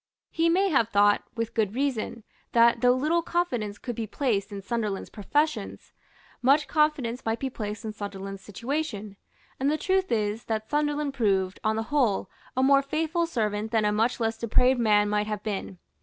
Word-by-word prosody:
He 330 0 +2
may 385 +4 +3
have 235 - +2
thought, 205 -1 +4
with 230 0 -3
good 215 -1 0
reason, 250 -4 -2 0.3
that, 235 0 +5
though 245 -1 +5
little 310 +6 +1
confidence 245 -13 -2
could 240 +1 -5
be 225 -1 -3
placed 215 -5 -1
in 200 -1 -6
Sunderland's 210 -3 -3
professions, 295 +9 -2 0.5
much 280 +4 +4
confidence 295 -6 +1
might 225 0 -1
be 265 +2 -3
placed 215 -1 -5
in 215 - -4
Sunderland's 195 -1 -6
situation; 225 -1 -4 0.4
and 270 +2 +2
the 305 - +1
truth 380 +4 0
is 215 0 -1
that 220 -1 -2
Sunderland 295 -1 0
proved, 195 -7 0
on 215 0 +1
the 225 - -1
whole, 245 -9 +1 0.3
a 260 - +3
more 275 +1 +5
faithful 320 +4 -1
servant 215 -6 -1
than 220 -2 +1
a 210 - +3
much 225 +4 +1
less 225 -1 -1
depraved 250 +3 +3
man 210 -2 +4
might 210 0 0
have 210 -1 -4
been. 195 -3 -4
230 Hz, 180 wpm, -27 LUFS, 210-280 Hz, 0.5 s, that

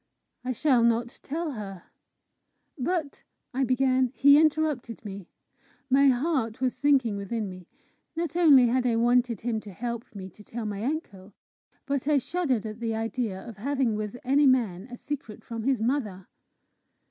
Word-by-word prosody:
I 255 - -2
shall 255 0 +3
not 235 +1 +1
tell 320 +2 -3
her." 195 -7 -7 0.9
"But," 310 +1 -2 0.3
I 265 +2 +1
began. 255 0 +2
He 280 +1 +7
interrupted 300 -8 0
me. 195 -3 -8 0.6
My 275 +1 +6
heart 255 -4 +1
was 255 -1 0
sinking 265 -7 +2
within 205 +2 -3
me. 185 -2 -10 0.5
Not 335 0 -3
only 295 -8 +7
had 250 +1 +1
I 235 - +2
wanted 240 -1 +2
him 230 -1 -1
to 210 -1 -11
help 235 +4 -4
me 190 -2 -7
to 210 - -16
tell 230 +1 -6
my 205 0 -4
uncle, 210 - -4 0.5
but 280 -1 -2
I 300 -1 +4
shuddered 270 - -1
at 215 +1 -6
the 225 -1 -2
idea 225 -3 -3
of 225 -4 -9
having 265 +1 0
with 215 +2 -4
any 275 +3 +4
man 225 -7 +1
a 245 - -8
secret 270 -8 -6
from 230 -1 -6
his 260 -5 +1
mother. 220 -8 -1
245 Hz, 160 wpm, -27 LUFS, 215-275 Hz, 0.9 s, He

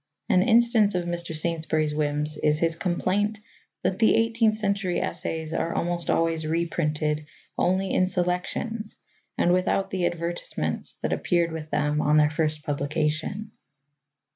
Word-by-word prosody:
An 185 - +5
instance 225 -2 +4
of 180 -1 0
Mr. 170 -1 -3
Saintsbury's 155 -1 0
whims 150 0 -1
is 150 0 +2
his 165 +1 +1
complaint 190 +5 0 0.5
that 185 +1 0
the 220 - +5
eighteenth 225 -1 +2
century 200 -4 0
essays 160 0 -3
are 165 - -1
almost 175 0 -2
always 165 -1 +2
reprinted 155 -2 -1 0.3
only 185 +2 +1
in 185 - +3
selections 190 +5 -2 0.4
and 175 - +3
without 185 +1 +1
the 180 -2 +1
advertisements 175 0 -3
that - - 0
appeared 170 -2 +1
with 160 -1 -6
them 150 0 +1
on 150 +1 +3
their 150 0 +4
first 155 -1 -1
publication. 155 +8 -2
170 Hz, 140 wpm, -26 LUFS, 155-190 Hz, 0.5 s, An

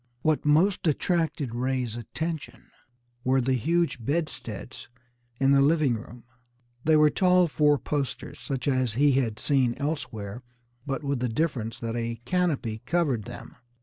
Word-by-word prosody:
What 155 -1 +2
most 170 +5 +3
attracted 155 - 0
Ray's 125 -2 -1
attention 130 +1 -5 0.5
were 130 +1 +3
the 130 +1 +1
huge 160 +1 0
bedsteads 140 - -4 0.5
in 135 0 +4
the 140 0 +5
living 150 -2 +3
room. 115 +1 -8 0.6
They 155 0 +4
were 150 -1 +5
tall 180 +1 +4
four 150 -1 +3
posters, 140 -1 -4
such 135 -1 -4
as 130 -4 +1
he 145 +5 +4
had 125 -5 0
seen 130 -4 +1
elsewhere, 125 -7 -4 0.5
but 140 +2 -2
with 140 -2 -1
the 125 0 -1
difference 115 -3 -1
that 115 0 -3
a 115 -1 -3
canopy 135 -9 0
covered 145 -11 +1
them. 120 - -10
135 Hz, 145 wpm, -27 LUFS, 120-155 Hz, 0.6 s, the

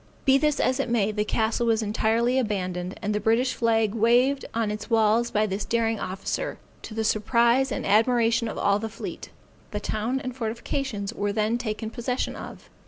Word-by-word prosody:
Be 270 -1 +5
this 300 0 +1
as 260 +1 +1
it 275 - -1
may, 215 -3 +2
the 210 0 0
castle 225 +2 0
was 225 -1 +2
entirely 225 +4 +1
abandoned, 185 -5 -2
and 210 +1 0
the 210 - 0
British 230 +5 +2
flag 225 -3 +1
waived 245 +5 +3
on 225 -2 -1
its 210 - -6
walls 225 +1 +3
by 215 -1 +1
this 200 0 -3
daring 225 -2 0
officer, 195 - -3 0.2
to 215 - -9
the 225 - -1
surprise 235 +5 +2
and - - -3
admiration 230 +2 +3
of - - -5
all 200 0 +2
the 225 +1 -4
fleet. 220 - -7 0.4
The 210 - -3
town 220 +5 -2
and 255 -2 -6
fortifications 230 -2 -3
were 205 -3 -1
then 215 +3 0
taken 220 -1 -4
possession 245 +2 -2
of. - - -9
225 Hz, 185 wpm, -25 LUFS, 210-240 Hz, 0.4 s, Be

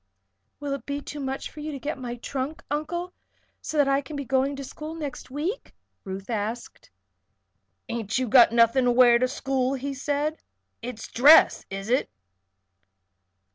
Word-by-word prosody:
"Will 285 -1 -3
it 275 - -6
be 285 0 -2
too 290 +1 -8
much 270 -1 -4
trouble - - -8
for 310 - -10
you 305 +1 -4
to 275 - -6
get 290 +1 -4
my 245 -2 -5
trunk, 270 +5 -5
Uncle, 345 +5 -3 0.5
so 310 - -4
that 290 -2 +4
I 275 0 +2
can 285 +2 -9
begin 280 -2 -5
going 270 +1 +1
to 275 - -6
school 305 +4 -7
next 290 -7 -6
week?" 315 - -4 0.3
Ruth 195 0 -7
asked. 225 +1 -4 1.0
"Ain't 230 -2 -2
you 255 -1 0
got 240 +1 +7
nothin' 235 +2 +4
to 245 - +4
wear 240 -1 +6
to 255 - +2
school?" 265 0 -1
he 275 +1 -4
said. 290 +3 -2 0.4
"It's 230 -2 -6
dress; 295 +7 +6
is 195 +2 -6
it? 255 - +2
270 Hz, 175 wpm, -26 LUFS, 245-290 Hz, 1.0 s, got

